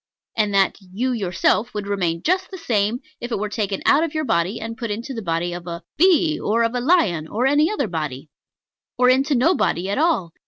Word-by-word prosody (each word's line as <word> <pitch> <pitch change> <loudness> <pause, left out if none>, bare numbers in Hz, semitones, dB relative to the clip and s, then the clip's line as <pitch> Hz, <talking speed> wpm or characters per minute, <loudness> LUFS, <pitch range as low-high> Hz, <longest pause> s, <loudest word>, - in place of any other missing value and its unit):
And 210 -2 +1
that 195 -1 +3
"you 200 +8 -3
yourself" 215 +1 0
would 205 -1 -3
remain 180 -5 -1
just 375 +3 +1
the 380 - -8
same 225 - 0 0.2
if 240 - -6
it - - 0
were 210 +1 -3
taken 205 -2 -3
out 295 +3 +5
of 325 -2 -3
your 310 - 0
body, 180 +1 0
and 225 +1 -6
put 230 0 -5
into 230 +6 -4
the 225 - -5
body 170 -1 -2
of 175 0 -8
a 170 0 -6
bee, 335 -2 +3
or 230 +2 +1
of 230 +1 0
a 250 - -1
lion, 215 - +2
or 230 +9 -1
any 295 +4 +3
other 280 - -1
body; 150 -5 -5 0.7
or 250 0 +5
into 275 +3 +2
no 265 +9 +4
body 190 - 0
at 235 - -1
all. 300 - +1
225 Hz, 225 wpm, -21 LUFS, 185-270 Hz, 0.7 s, out